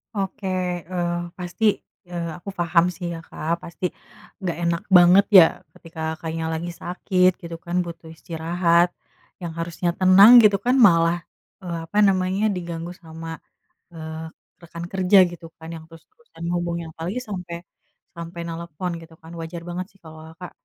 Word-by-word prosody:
Oke, 195 0 -3 0.4
eee, 175 -1 -2 0.2
pasti, 180 +5 -3 0.4
eee, 170 -1 -4
aku 185 - -23
paham 170 0 +3
sih 180 - -7
ya 165 - -6
Kak, 165 +2 -3
pasti, 170 +2 -6 0.6
nggak 175 -3 -2
enak 170 0 0
banget 180 +3 +7
ya, 175 - +11 0.3
ketika 165 -1 -13 0.2
Kakaknya 160 0 -4
lagi 170 +2 -3
sakit, 180 +1 +2
gitu 170 -1 -7
kan, 175 +1 -3
butuh 170 -1 -9
istirahat, 170 +1 +1 0.5
yang 170 - -4
harusnya 170 +1 -2
tenang 190 +4 +8
gitu 205 -1 +6
kan 250 +2 +3
malah, 165 0 +3 0.4
eee, 170 -2 -4
apa 205 - -6
namanya, 190 +2 +1
diganggu 170 -1 -5
sama, 165 -1 -10 0.7
eee, 160 0 -7 0.3
rekan 170 0 -9
kerja 190 +1 +3
gitu 170 -1 -11
kan, 160 0 -10
yang 160 - -9
terus-terusan 165 - -18
menghubungnya 170 -1 -2
apalagi 175 +9 -4
sampai 180 -5 -7 0.5
sampai 170 +1 -7
nlepon 170 +1 -5
gitu 165 0 -15
kan, 160 +1 -13
wajar 165 +1 -6
banget 180 +1 -4
sih - - -24
kalau 160 0 -12 0.2
Kakak, 180 +1 -9
170 Hz, 150 wpm, -23 LUFS, 165-180 Hz, 0.7 s, ya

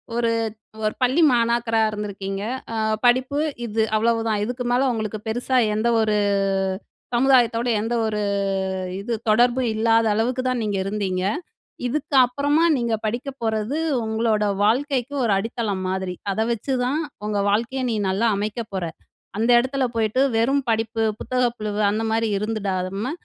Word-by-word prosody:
ஒரு, 235 -1 +1 0.5
ஒரு 215 - +1
பள்ளி 255 +6 +3
மாணாக்கராக 230 -2 +2
இருந்திருக்கீங்க. 200 -2 -4 0.3
அ - - -3 0.3
படிப்பு 255 +4 +3 0.3
இது 220 0 0
அவ்வளவுதான். 225 -1 +1
இதுக்கு 245 +2 -4
மேல 255 +2 +3
உங்களுக்கு 215 -1 -3
பெருசா 245 +3 0 0.2
எந்த 215 +2 0
ஒரு 215 -1 +1 1.0
சமுதாயத்தோடு 245 -2 +3
எந்த 225 +2 -2
ஒரு 210 -1 -1 0.8
இது 235 +4 -3 0.2
தொடர்பும் 240 +3 +3
இல்லாத 225 +1 +3
அளவுக்கு 240 +4 0
தான் 250 -2 -1
நீங்க 205 -2 -1
இருந்தீங்க. 195 -2 -2 0.6
இதுக்கு 285 +2 -2
அப்பறமா 285 +5 +1
நீங்க 235 -2 0
படிக்க 240 +5 -2
போறது 220 +4 -1 0.3
உங்களோட 220 -1 +1 0.2
வாழ்க்கைக்கு 260 +3 0
ஒரு 225 - +1
அடித்தளம் 210 -2 -2
மாதிரி. 190 -1 -3 0.2
அத 195 - -4
வச்சுதான் 255 +5 -1 0.3
உங்க 210 -1 -1
வாழ்க்கைய 235 +6 0
நீ - - 0
நல்லா 200 +5 +1
அமைக்க 210 +3 -2
போற. 190 - -2 0.5
அந்த 230 +3 +1
இடத்துல 260 +2 -1
போயிட்டு 225 +3 +1 0.2
வெறும் 270 +5 +2
படிப்பு, 225 0 0 0.2
புத்தக 255 0 0
புழுவு 210 -1 -3
அந்தமாரி 225 +1 0
இருந்துடாத 195 -3 -2 0.2
ம 260 - -2
225 Hz, 135 wpm, -23 LUFS, 215-245 Hz, 1.0 s, பள்ளி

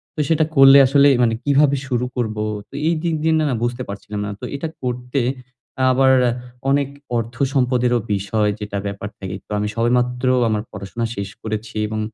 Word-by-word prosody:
তো - - -7
সেটা 160 -1 +3
করলে 135 0 +8
আসলে 140 +1 +5 0.2
মানে 115 -1 +2
কিভাবে 140 0 +3
শুরু 125 -1 0
করব? 110 -3 -2 0.3
তো - - -25
এই 170 - +3
দিক 165 -1 0
দিয়ে 160 0 +2 0.2
না 125 - 0
বুঝতে 120 +1 -2
পারছিলাম 100 +1 -6
না। - - -4
তো - - -6
এটা 160 +4 -3
করতে 125 +1 -2 0.7
আবার 130 +1 +4
অ্যা 120 - +2 0.4
অনেক 140 0 +2 0.3
অর্থ-সম্পদেরও 125 0 +1
বিষয়, 105 +2 0
যেটা 105 -1 -4
ব্যাপার 100 +1 -5
থাকে। 95 -1 -5
তো - - -16
আমি 105 - -1
সবেমাত্র 125 +2 +1 0.2
আমার 105 -1 0
পড়াশোনা 115 +4 -4
শেষ 100 -1 -4
করেছি 110 0 -5
এবং 110 0 -3
125 Hz, 175 wpm, -20 LUFS, 110-135 Hz, 0.7 s, করলে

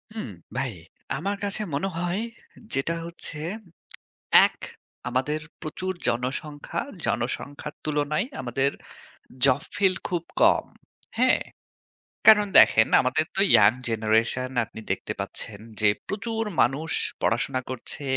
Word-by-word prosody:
হুম, 215 - -4 0.3
ভাই 130 -3 -1 0.4
আমার 200 +1 -2
কাছে 205 +1 0
মনে 170 +7 0
হয় 175 +4 -1 0.5
যেটা 140 +5 0
হচ্ছে, 170 -2 -5 1.1
এক - - -3 0.5
আমাদের 140 +5 0 0.2
প্রচুর 185 +4 -3
জনসংখ্যা, 140 +5 -2 0.2
জনসংখ্যার 145 +1 -3
তুলনায় 150 +7 0
আমাদের 135 +2 0 0.7
জব 130 -2 +4
ফিলড 190 -1 +3
খুব 175 -2 -1 0.2
কম। - - +5 0.5
হ্যাঁ? 255 +2 +4 0.9
কারণ 210 -1 +9
দেখেন, 110 - +6
আমাদের 130 +4 +1
তো - - 0
ইয়ং 100 0 +8 0.2
জেনারেশন, 115 +3 +1 0.2
আপনি 110 0 -11
দেখতে - - -2
পাচ্ছেন 100 -2 -5 0.2
যে, 105 - +6 0.2
প্রচুর 225 +2 -2 0.2
মানুষ 150 +6 +1 0.3
পড়াশোনা 130 +3 +1
করছে, 130 +3 -5
145 Hz, 110 wpm, -26 LUFS, 125-185 Hz, 1.1 s, কারণ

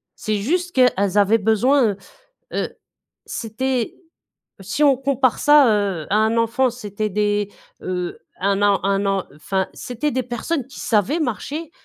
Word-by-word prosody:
C'est 215 -1 -2
juste 355 - -1
qu'elles 210 -6 +3
avaient 205 +2 +5
besoin, 220 +1 +3 0.6
heu, - - -3 0.5
c'était 245 +1 -2 0.6
si 205 +10 0
on 275 -2 +5
compare 265 -1 +1
ça, 295 -3 +6
heu, 200 -7 0
à 205 - +3
un 220 +1 +2
enfant, 235 +3 +2
c'était 215 -3 -4
des, 205 0 0 0.3
heu, 180 -1 -3 0.2
1 200 +1 +1
an 200 -1 +4
1 200 0 +1
an, 195 -1 0
enfin, 190 +5 -2
c'était 250 +5 -3
des 255 - 0
personnes 245 +4 -3
qui 270 - -13
savaient 225 - +1
marcher 300 +4 -3
220 Hz, 145 wpm, -21 LUFS, 200-260 Hz, 0.6 s, ça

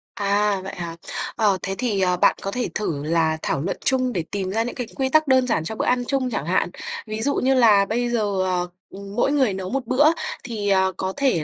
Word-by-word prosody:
À, 200 0 +1
vậy 195 - -6
hả? 170 -2 -5 0.4
Ờ, 205 -4 +2
thế 195 - -2
thì, 225 -6 0
ờ, 180 -1 +2
bạn - - +4
có 195 - -3
thể 250 +3 -2
thử 150 -9 -2
là 160 0 +1
thảo 135 - -1
luận 180 - -2
chung 255 -2 +2
để 170 - -1
tìm 190 -2 -2
ra 225 +3 +1
những 240 - -5
cái 245 - -4
quy 265 -1 0
tắc 310 +2 +3
đơn 260 -1 +4
giản 165 -9 +1
cho 220 - -4
bữa - - -2
ăn 250 0 +2
chung 270 -2 0
chẳng 150 - -2
hạn 180 0 +1 0.4
ví 215 0 -4
dụ 285 +4 +1
như 265 +1 +2
là 215 -6 +5
bây 240 +4 -1
giờ, 205 -5 0
ờ, 180 -1 0 0.2
ừm, 200 +1 -10
mỗi 275 - +2
người 265 -9 +2
nấu 190 -1 -5
1 270 +2 -2
bữa 275 +3 +3 0.4
thì, 215 -4 -3
ờ, 190 -1 +3
có 190 0 -2
thể 260 - +2
205 Hz, 245 wpm, -23 LUFS, 190-250 Hz, 0.4 s, là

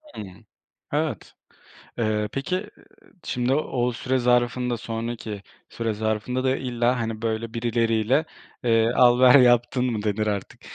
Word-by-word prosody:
Hı. - - -6 0.7
Evet, - - -2 0.7
eee, 105 -2 0
peki 185 +9 -3 0.5
şimdi 125 +1 -1
o 125 -4 0
süre 130 +2 -1
zarfında, 125 0 +1
sonraki 115 -2 -5 0.3
süre 115 -1 -3
zarfında 110 +4 -2
da 130 0 +2
illa 125 -1 0
hani 110 -1 -4
böyle 115 0 -3
birileriyle, 115 +3 +1 0.4
eee, 115 -1 +3
al 125 -1 +5
ver 130 +2 +8
yaptın 120 0 +3
mı 110 -3 -3
denir 105 0 -1
artık. 100 -2 -4
120 Hz, 130 wpm, -24 LUFS, 110-125 Hz, 0.7 s, ver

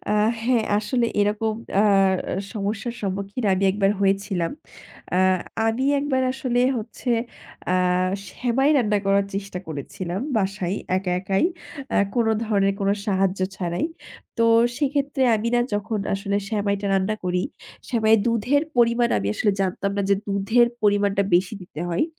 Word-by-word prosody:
আ - - 0 0.3
হ্যাঁ, 235 -1 +2
আসলে 235 +3 0
এরকম 210 +2 +1 0.3
আ - - +5 0.7
সমস্যার 215 +2 -3
সম্মুখীন 200 +4 -3
আমি 190 +1 +1
একবার 195 0 +2
হয়েছিলাম। 195 -3 0 0.6
আ - - +2 0.5
আমি 225 +4 0
একবার 270 -2 0
আসলে 250 -2 -1 0.2
হচ্ছে, 235 +2 -5 0.6
আ - - +2 0.6
সেমাই 260 +7 +1
রান্না 210 -5 +2
করার 195 0 +3
চেষ্টা 195 -2 -4
করেছিলাম 170 +5 -5 0.2
বাসায় 195 -2 -1 0.2
একা 185 -1 -1
একাই, 195 - +1 0.5
আ - - +3 0.2
কোন 235 -2 +2 0.2
ধরনের 195 -2 +1
কোন 195 - +1 0.2
সাহায্য 195 -1 +1 0.2
ছাড়াই। 175 - -1 0.5
তো 230 - +4 0.3
সেক্ষেত্রে 280 -1 0
আমি 225 +2 -2
না 240 - +4
যখন 210 +1 -2 0.2
আসলে 200 0 -2
সেমাইটা 200 -2 -1
রান্না 195 +3 +1
করি, 180 0 0 0.5
সেমাই 220 -3 +4
দুধের 240 +6 +2
পরিমাণ 235 0 +3
আমি 100 0 -2
আসলে 210 - +2
জানতাম 195 +1 -1
না 200 - +1
যে - - +6
দুধের 205 +4 +3 0.2
পরিমাণটা 205 -1 +2
বেশি 185 +4 +2
দিতে 160 -3 -9
হয়। 170 - +1
205 Hz, 140 wpm, -23 LUFS, 195-235 Hz, 0.7 s, যে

